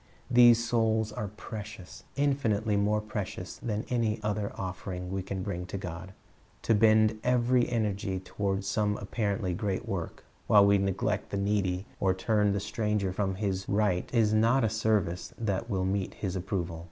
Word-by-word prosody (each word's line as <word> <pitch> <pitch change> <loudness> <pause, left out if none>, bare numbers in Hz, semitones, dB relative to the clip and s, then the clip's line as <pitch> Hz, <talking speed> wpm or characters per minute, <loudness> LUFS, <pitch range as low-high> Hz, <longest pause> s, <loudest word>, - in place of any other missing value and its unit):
These 120 -1 +7
souls 110 -2 +1
are 105 - -4
precious, 105 -2 -9
infinitely 115 -7 +1
more 105 +1 +2
precious 105 -4 -5
than 110 -2 -3
any 115 -3 0
other 105 -1 -1
offering 90 -1 -5
we 95 0 -1
can 95 0 -4
bring 90 -3 -4
to 100 - -4
God. 95 0 -7 0.5
To 115 - +3
bend 110 0 +4
every 125 0 +2
energy 100 -4 -1
toward 95 +1 -2
some 105 0 0
apparently 100 -2 -2
great 95 +1 -2
work, - - -4 0.2
while 100 -1 +7
we 100 0 +4
neglect 95 -1 -1
the 100 - -3
needy 100 -2 0
or 95 -1 +2
turn 105 +1 +2
the 100 - 0
stranger 105 -1 -1
from 95 -1 -1
his 95 -1 -2
right, 100 -3 +1
is 110 -3 +3
not 115 +4 +4
a 110 - +3
service 105 -6 0
that 110 0 -2
will 95 -3 0
meet 95 0 -1
His 95 -2 -3
approval. 90 -3 -3
105 Hz, 165 wpm, -29 LUFS, 95-110 Hz, 0.5 s, These